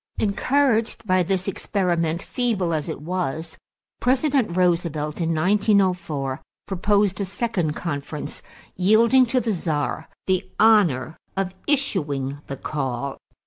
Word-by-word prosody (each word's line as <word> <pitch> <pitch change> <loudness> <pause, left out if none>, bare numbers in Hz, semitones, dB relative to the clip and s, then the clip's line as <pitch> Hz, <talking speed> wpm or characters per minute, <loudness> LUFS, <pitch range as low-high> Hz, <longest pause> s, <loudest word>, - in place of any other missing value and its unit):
Encouraged 230 +2 +1
by 185 -2 +3
this 185 +1 -1
experiment, 175 -3 -1
feeble 215 -9 0
as 155 +1 -2
it 155 - -5
was, 160 -1 -3 0.4
President 260 - +1
Roosevelt 170 -3 0
in 165 - 0
1904 180 -7 +1 0.2
proposed 200 +1 +1
a - - 0
second 190 -5 -1
conference, 150 -2 -5 0.3
yielding 230 +7 +5
to 255 +2 +2
the 235 -2 -1
Czar 160 -4 -2 0.2
the 185 -1 0
honor 170 - +4 0.2
of 190 -1 -1
issuing 145 - -1
the 135 - -5
call. 135 -2 -3
180 Hz, 115 wpm, -23 LUFS, 155-210 Hz, 0.4 s, yielding